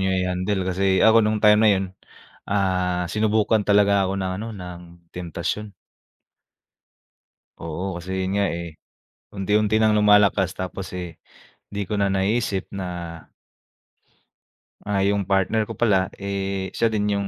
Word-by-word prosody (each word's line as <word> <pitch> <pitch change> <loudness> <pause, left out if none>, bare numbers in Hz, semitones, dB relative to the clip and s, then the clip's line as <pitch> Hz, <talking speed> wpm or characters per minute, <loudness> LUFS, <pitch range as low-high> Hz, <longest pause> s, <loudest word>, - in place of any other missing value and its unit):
niyo 95 0 +1
i-handle, 95 +1 -1
kasi 95 +1 +1
ako, 110 +1 +7
no'ng 110 0 +1
time 105 0 +6
na 110 - +6
'yon, 95 -1 +2 0.7
ah, 90 -3 0
sinubukan 110 0 +2
talaga 100 -1 +4
ako 95 - -2
ng 95 -1 -2
ano, 115 - -5
ng 90 -2 -8 0.3
temptasyon. 90 +4 -4 1.9
Oo, 85 +3 -4
kasi 95 +1 -4
'yon 95 - -2
nga 100 0 +2
eh, 85 -1 -5 0.6
unti-unti 105 +2 +1
ng 110 -1 +3
lumalakas, 105 -3 +4
tapos 95 +1 -5
eh, 85 -3 -8 0.5
'di 100 0 -4
ko 105 +2 -3
na 100 - +2
naiisip 100 +1 0
na 95 -2 -5 1.9
ah, 100 -1 -1
yung 100 0 +1
partner 100 +3 +1
ko - - -6
pala, 95 -5 +2
eh, 100 -1 -3
siya 115 - +1
din 105 -1 0
yung 100 0 -1
100 Hz, 140 wpm, -23 LUFS, 95-105 Hz, 1.9 s, ako